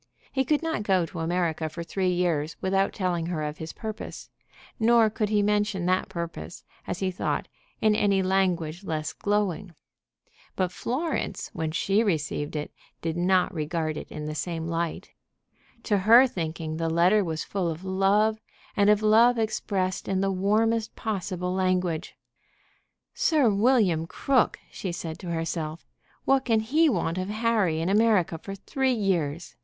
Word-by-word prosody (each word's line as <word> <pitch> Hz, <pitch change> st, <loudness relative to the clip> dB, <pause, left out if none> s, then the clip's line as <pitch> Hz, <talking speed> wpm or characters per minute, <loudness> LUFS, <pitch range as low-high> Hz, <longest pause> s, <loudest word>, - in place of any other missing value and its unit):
He 265 Hz, -1 st, +1 dB
could 300 Hz, +4 st, +1 dB
not 325 Hz, -9 st, -1 dB
go 190 Hz, -4 st, +2 dB
to 165 Hz, -, -8 dB
America 165 Hz, -1 st, -1 dB
for 170 Hz, +2 st, -6 dB
three 185 Hz, +2 st, -1 dB
years 170 Hz, -4 st, 0 dB
without 195 Hz, +1 st, +1 dB
telling 175 Hz, -3 st, -1 dB
her 165 Hz, -3 st, -2 dB
of 150 Hz, 0 st, -4 dB
his 160 Hz, 0 st, -5 dB
purpose; 220 Hz, 0 st, -7 dB, 0.5 s
nor 225 Hz, -1 st, +5 dB
could 215 Hz, -1 st, -1 dB
he 210 Hz, -1 st, +2 dB
mention 210 Hz, -3 st, +1 dB
that 185 Hz, +1 st, +1 dB
purpose, 170 Hz, 0 st, -6 dB, 0.2 s
as -, -, -2 dB
he 190 Hz, -1 st, 0 dB
thought, 180 Hz, -, -2 dB, 0.3 s
in 215 Hz, -1 st, +4 dB
any 200 Hz, -2 st, +2 dB
language 185 Hz, -3 st, 0 dB
less 155 Hz, -4 st, -3 dB
glowing. 205 Hz, -3 st, -1 dB, 0.8 s
But 185 Hz, -1 st, 0 dB
Florence, 270 Hz, -, -3 dB
when 160 Hz, -1 st, -2 dB
she 195 Hz, +6 st, +1 dB
received 155 Hz, -7 st, -1 dB
it, 150 Hz, 0 st, -4 dB, 0.3 s
did 165 Hz, -1 st, -1 dB
not 180 Hz, +1 st, +2 dB
regard 155 Hz, -1 st, -2 dB
it -, -, -6 dB
in 150 Hz, 0 st, -6 dB
the 155 Hz, -, -3 dB
same 165 Hz, +1 st, -3 dB
light. 165 Hz, 0 st, -3 dB, 0.7 s
To 205 Hz, -3 st, +1 dB
her 230 Hz, +7 st, +7 dB
thinking 160 Hz, -7 st, -4 dB
the 165 Hz, 0 st, -1 dB
letter 180 Hz, +6 st, +4 dB
was 160 Hz, -3 st, -3 dB
full 190 Hz, -4 st, -2 dB
of 165 Hz, +3 st, -6 dB
love, 200 Hz, +3 st, +2 dB, 0.4 s
and 205 Hz, 0 st, +4 dB
of 210 Hz, 0 st, +4 dB
love 230 Hz, +3 st, +5 dB
expressed 195 Hz, -4 st, -1 dB
in 190 Hz, -1 st, 0 dB
the 195 Hz, 0 st, +1 dB
warmest 215 Hz, +4 st, +1 dB
possible 185 Hz, -4 st, -3 dB
language. 185 Hz, -3 st, 0 dB, 1.0 s
"Sir 310 Hz, -, +3 dB
William 200 Hz, -7 st, +3 dB
Crook!" 260 Hz, +6 st, +1 dB
she 185 Hz, -, -4 dB
said 165 Hz, -1 st, -6 dB
to 180 Hz, -, -7 dB
herself. 165 Hz, -1 st, -3 dB, 0.4 s
"What 270 Hz, 0 st, +3 dB
can 225 Hz, -3 st, +3 dB
he 305 Hz, +9 st, +3 dB
want 175 Hz, -, -1 dB
of 185 Hz, +1 st, -3 dB
Harry 215 Hz, -7 st, +1 dB
in 165 Hz, -, -1 dB
America 200 Hz, -5 st, +3 dB
for 195 Hz, +3 st, -7 dB
three 260 Hz, +6 st, 0 dB
years? 175 Hz, -8 st, -1 dB
185 Hz, 160 wpm, -26 LUFS, 165-215 Hz, 1.0 s, her